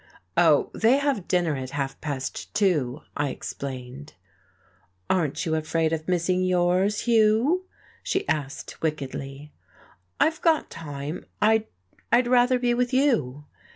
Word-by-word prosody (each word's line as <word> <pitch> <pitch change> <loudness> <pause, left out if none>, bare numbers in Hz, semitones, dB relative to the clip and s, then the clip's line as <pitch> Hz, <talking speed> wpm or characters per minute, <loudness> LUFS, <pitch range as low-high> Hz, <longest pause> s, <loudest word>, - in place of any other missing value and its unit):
"Oh, - - +4
they 235 +4 +4
have 280 -10 -1
dinner 175 -4 +1
at 130 -1 -5
half 135 -1 -3
past 140 -4 -4
two," 155 - +1
I 145 -1 0
explained. 130 +1 -7 1.0
"Aren't 160 -7 0
you 160 - -1
afraid 160 +1 0
of 155 -1 -3
missing 180 0 +1
yours, 185 +3 +2
Hugh?" 235 +10 +3 0.4
she 410 -5 -2
asked 145 -2 -3
wickedly. 140 -1 -4 0.7
"I've 320 0 +2
got 325 -3 +2
time. 145 0 -6
I'd 220 +1 +3 0.5
I'd 240 +2 +5
rather 250 +1 +4
be 245 -1 +1
with 245 0 0
you." 150 - +1
175 Hz, 125 wpm, -25 LUFS, 145-235 Hz, 1.0 s, I'd